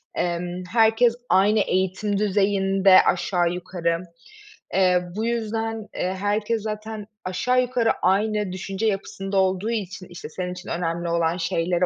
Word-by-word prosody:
emm, 175 +1 -2
herkes 225 +1 +4
aynı 205 +3 +4
eğitim 190 +1 0
düzeyinde 195 -1 +4
aşağı 175 -1 +1
yukarı. 175 -2 -2 0.7
Eee, 180 -2 +4
bu 220 +2 -1
yüzden, 225 -1 -2
eee, 185 +1 -1
herkes 210 +3 0
zaten 215 0 -5 0.2
aşağı 250 +8 +1
yukarı 245 -2 +1
aynı 210 +1 +1
düşünce 195 +3 -4
yapısında 195 -1 -2
olduğu 190 +2 +1
için, 195 -4 -4
işte, 175 -3 -9
senin 180 +3 -4
için 180 +1 -9
önemli 170 0 -2
olan 170 0 +1
şeylere 170 +1 0
195 Hz, 130 wpm, -24 LUFS, 180-215 Hz, 0.7 s, herkes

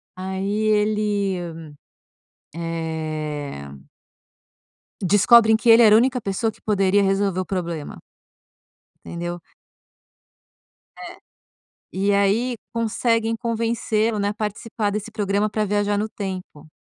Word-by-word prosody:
Aí, 190 +1 -4 0.2
ele, 210 -2 +1 1.2
eh 155 - -4 1.4
Descobrem 220 +4 +5
que 235 - -2
ele 230 +1 +8
era 215 -2 +7
a 220 - +8
única 250 +1 +1
pessoa 220 +2 -2
que - - -24
poderia 200 -1 +2
resolver 195 -1 +1
o - - -2
problema. 170 -4 -5 1.1
Entendeu? 175 +1 -5 1.6
É. - - -9 0.8
E, 200 +2 0
aí, 205 +5 +2 0.2
conseguem 230 0 0
convencê-lo, 225 -1 -1
né, 200 0 0
a - - -3
participar 215 0 -3
desse 210 +2 -4
programa 205 0 0
pra 215 0 -1
viajar 205 0 0
no 215 - -1
tempo. 185 -8 -7
205 Hz, 105 wpm, -22 LUFS, 185-220 Hz, 1.6 s, ele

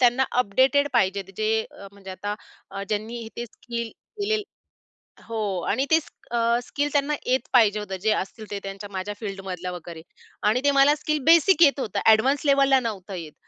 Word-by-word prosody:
त्यांना 250 +1 +4 0.2
अपडेटेड 265 +7 +2
पाहिजेत 195 0 +1
जे, 215 0 0 0.4
म्हणजे 195 -1 -11
आता 205 +2 -4 0.4
अ, 195 0 -5
ज्यांनी 220 +2 -3
ते 240 - -4
स्किल 235 0 -6
केलेल 425 0 -3 0.9
हो. 225 -1 -4 0.3
आणि 270 - +1
तेच 320 -1 +3 0.2
अ, 235 0 +2
स्किल 290 +2 -2
त्यांना 290 +1 +1
येत 255 0 0
पाहिजे 215 -4 +5
होतं, 190 -2 -5
जे 220 0 +2
असतील 210 +2 -5
ते 200 - -3
त्यांच्या 195 +1 -7
माझ्या 195 +2 -4
फील्डमधल्या 190 -4 -5
वगैरे 170 -2 -8 0.5
आणि 250 +4 +1
ते 285 - +4
मला 280 +1 +5
स्किल 305 0 -1
बेसिक 335 +1 +5
येत 280 -1 +4
होतं, 215 - -2
ॲडवान्स 260 +7 +4
लेव्हलला 275 -1 +4
नव्हतं 205 -5 -5
येत. 160 -4 -7
230 Hz, 170 wpm, -24 LUFS, 200-275 Hz, 0.9 s, पाहिजे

